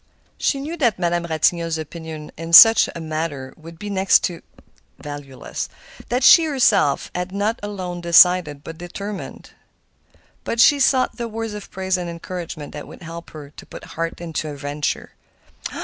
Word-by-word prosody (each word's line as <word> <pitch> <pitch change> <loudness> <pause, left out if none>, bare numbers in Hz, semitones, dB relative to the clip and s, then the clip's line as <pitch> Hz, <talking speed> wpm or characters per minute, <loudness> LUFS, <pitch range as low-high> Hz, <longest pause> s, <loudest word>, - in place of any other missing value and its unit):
She 275 - 0
knew 310 +5 -5
that 240 - +1
Madame 175 -1 -1
Ratignolle's 165 +1 0
opinion 160 -1 -8
in 165 +1 -7
such 225 +6 +9
a - - -5
matter 155 -4 -4
would 165 +1 -13
be 210 - -8
next 195 -1 +3
to 170 -2 -3 0.6
valueless, 145 -3 -7 0.4
that 250 +2 0
she 330 - +8
herself 225 - +2
had 180 +1 -4
not 205 +4 -1
alone 185 -4 -5
decided, 170 -4 +4
but 165 +1 -9
determined; 200 +3 -8 0.9
but 230 - -3
she 285 +4 +6
sought 260 -1 +2
the 235 -1 -3
words 225 -1 -5
of 210 -1 -8
praise 190 0 -2
and 175 -1 -5
encouragement 170 -2 -7
that 150 - -8
would - - -13
help 165 +1 -9
her 145 -2 -11
to - - -13
put - - -11
heart 165 0 -4
into 165 -2 -4
her 150 - -6
venture. 145 +1 -4
170 Hz, 165 wpm, -21 LUFS, 160-205 Hz, 0.9 s, such